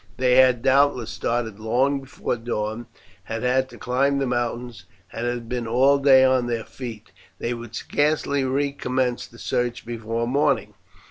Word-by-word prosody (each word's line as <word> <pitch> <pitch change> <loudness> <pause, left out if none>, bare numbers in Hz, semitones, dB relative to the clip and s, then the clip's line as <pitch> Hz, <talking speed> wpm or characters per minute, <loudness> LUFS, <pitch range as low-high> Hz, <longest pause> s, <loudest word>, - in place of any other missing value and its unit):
They 125 0 +3
had, 130 -2 +5
doubtless, 135 -3 +3
started 115 -3 -2
long 130 +6 +1
before 135 -2 -4
dawn, 115 -1 -4 0.4
had 110 +1 -4
had 130 +1 +1
to - - -13
climb 135 +3 +1
the 140 - 0
mountains, 120 -1 -3 0.3
and 120 - -3
had 120 -1 -3
been 120 -1 -3
all 135 +5 +4
day 135 -2 +6
on 130 -2 +2
their 115 -2 -2
feet. 115 -4 -9 0.3
They 120 - -2
would 115 -1 -8
scarcely 145 0 0
recommence 130 -2 -1
the 115 - -17
search 120 0 -2
before 115 0 -3
morning. 145 +4 +1
125 Hz, 155 wpm, -23 LUFS, 115-135 Hz, 0.4 s, day